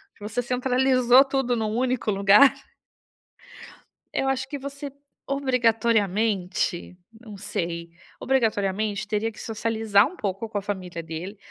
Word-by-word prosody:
que -, -, -26 dB
você 210 Hz, +3 st, -2 dB
centralizou 255 Hz, +1 st, +4 dB
tudo 270 Hz, -3 st, -1 dB
num 220 Hz, -2 st, -2 dB
único 250 Hz, -3 st, 0 dB
lugar 200 Hz, +7 st, +6 dB, 1.6 s
eu 270 Hz, -, 0 dB
acho 265 Hz, -1 st, -1 dB
que 290 Hz, -, -4 dB
você, 280 Hz, +1 st, -7 dB, 0.4 s
obrigatoriamente, 220 Hz, -9 st, 0 dB, 0.2 s
não 215 Hz, -4 st, -11 dB
sei, 170 Hz, -3 st, -4 dB, 0.3 s
obrigatoriamente 210 Hz, -4 st, 0 dB
teria 215 Hz, +1 st, -1 dB
que -, -, -15 dB
socializar 220 Hz, -2 st, +2 dB
um 365 Hz, -, -7 dB
pouco 200 Hz, +2 st, -3 dB
com 210 Hz, -, -4 dB
a -, -, -1 dB
família 185 Hz, -4 st, -5 dB
dele, 165 Hz, +5 st, -7 dB
220 Hz, 125 wpm, -24 LUFS, 200-255 Hz, 1.6 s, lugar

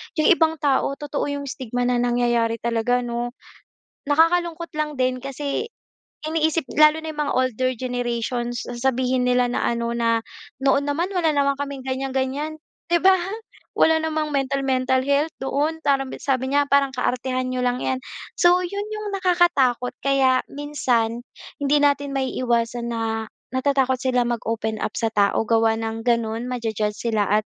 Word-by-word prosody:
'yong 310 Hz, +2 st, +4 dB
ibang 320 Hz, -2 st, +4 dB
tao 275 Hz, 0 st, +2 dB
totoo 295 Hz, 0 st, -3 dB
'yong 285 Hz, 0 st, -3 dB
stigma 245 Hz, -2 st, -3 dB
na 245 Hz, 0 st, +1 dB
nangyayari 240 Hz, -1 st, +1 dB
talaga 235 Hz, +1 st, +1 dB
'no? 240 Hz, +1 st, -4 dB, 0.7 s
Nakakalungkot 335 Hz, +2 st, +2 dB
lang 300 Hz, -2 st, -2 dB
din 255 Hz, -1 st, 0 dB
kasi, 280 Hz, -, -3 dB, 0.5 s
iniisip 315 Hz, -1 st, 0 dB
lalo 305 Hz, +1 st, +6 dB
na 315 Hz, -, -5 dB
'yong 300 Hz, -, -10 dB
mga 285 Hz, -, -1 dB
older 255 Hz, 0 st, +1 dB
generations, 240 Hz, -1 st, -2 dB
sasabihin 250 Hz, +1 st, 0 dB
nila 250 Hz, 0 st, +2 dB
na -, -, -1 dB
ano, 235 Hz, 0 st, -1 dB
na 230 Hz, -1 st, +1 dB, 0.4 s
"Noon 275 Hz, +1 st, +3 dB
naman 335 Hz, +6 st, -1 dB
wala 335 Hz, -5 st, +1 dB
naman 280 Hz, -1 st, +1 dB
kaming 280 Hz, -2 st, -5 dB
ganyan-ganyan", 270 Hz, +4 st, -3 dB, 0.2 s
'di 345 Hz, -1 st, +1 dB
ba? 375 Hz, 0 st, +6 dB, 0.6 s
Wala 320 Hz, 0 st, +4 dB
namang 310 Hz, -2 st, -2 dB
mental, 275 Hz, 0 st, 0 dB
mental 260 Hz, 0 st, +1 dB
health 285 Hz, +3 st, +2 dB
noon, 290 Hz, +4 st, -1 dB
parang 270 Hz, -2 st, +2 dB
sabi 260 Hz, -1 st, -1 dB
niya, 285 Hz, 0 st, +3 dB
parang, 280 Hz, -1 st, +3 dB
"Kaartehan 255 Hz, 0 st, -1 dB
n'yo 255 Hz, 0 st, -2 dB
lang 245 Hz, 0 st, +1 dB
'yan". 260 Hz, 0 st, -2 dB, 0.3 s
So 350 Hz, +1 st, +5 dB
'yon 400 Hz, +3 st, -4 dB
'yong 425 Hz, -1 st, -4 dB
nakakatakot 345 Hz, -10 st, +2 dB
kaya 265 Hz, -2 st, +3 dB
minsan, 245 Hz, -5 st, -1 dB, 0.4 s
hindi 285 Hz, +1 st, +3 dB
natin 285 Hz, -1 st, +2 dB
maiiwasan 240 Hz, -3 st, -1 dB
na, 230 Hz, -1 st, -2 dB, 0.5 s
natatakot 265 Hz, -1 st, +2 dB
sila 250 Hz, -2 st, +1 dB
mag-open 220 Hz, -2 st, -2 dB
up -, -, -3 dB
sa 225 Hz, -, +1 dB
tao 205 Hz, +2 st, +2 dB
gawa 225 Hz, 0 st, +3 dB
ng 225 Hz, 0 st, -4 dB
gano'n, 235 Hz, 0 st, 0 dB
ma-ju-judge 220 Hz, -4 st, -2 dB
sila 220 Hz, -3 st, 0 dB
at 215 Hz, -, -18 dB
260 Hz, 150 wpm, -23 LUFS, 240-290 Hz, 0.7 s, lalo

